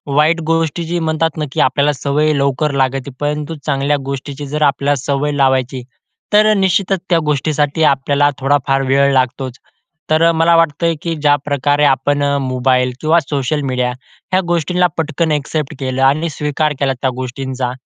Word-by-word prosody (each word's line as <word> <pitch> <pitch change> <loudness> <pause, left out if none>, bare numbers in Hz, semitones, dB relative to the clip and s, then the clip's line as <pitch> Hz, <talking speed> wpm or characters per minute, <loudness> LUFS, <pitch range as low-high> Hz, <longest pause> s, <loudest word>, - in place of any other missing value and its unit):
वाईट 160 +3 +3
गोष्टीची 165 +1 -1
म्हणतात 160 -1 -1
ना 150 - -1
की - - -4
आपल्याला 145 +2 +2
सवय 145 +3 0
लवकर 140 +2 0
लागते. 135 +1 -1
परंतु 150 +2 -3
चांगल्या 145 0 0
गोष्टीची 140 +1 -5
जर 150 +2 -4
आपल्याला 140 0 +2
सवय 145 +1 -1
लावायची, 130 -2 0 0.5
तर 215 +1 +5
निश्चितच 195 0 +1
त्या 170 -2 +3
गोष्टीसाठी 150 +1 0
आपल्याला 140 +1 +1
थोडा 140 +1 +2
फार 135 0 +2
वेळ 140 0 +3
लागतोच. 130 -1 -1 0.5
तर 160 +2 +4
मला 165 +1 +3
वाटतंय 165 0 +2
की 170 -1 -2
ज्याप्रकारे 145 0 +1
आपण 145 +1 +1
अ, 140 0 +1
मोबाईल 130 -1 +1
किंवा 160 +2 +3
सोशल 145 0 -2
मीडिया 125 -1 0 0.4
ह्या 185 0 +3
गोष्टींना 180 +2 +1
पटकन 160 0 -1
ॲक्सेप्ट 150 0 -2
केलं 130 -1 -2
आणि 150 +5 +2
स्वीकार 150 0 -1
केला 135 -1 +1
त्या 130 - +1
गोष्टींचा. 130 0 -4
145 Hz, 155 wpm, -16 LUFS, 135-160 Hz, 0.5 s, तर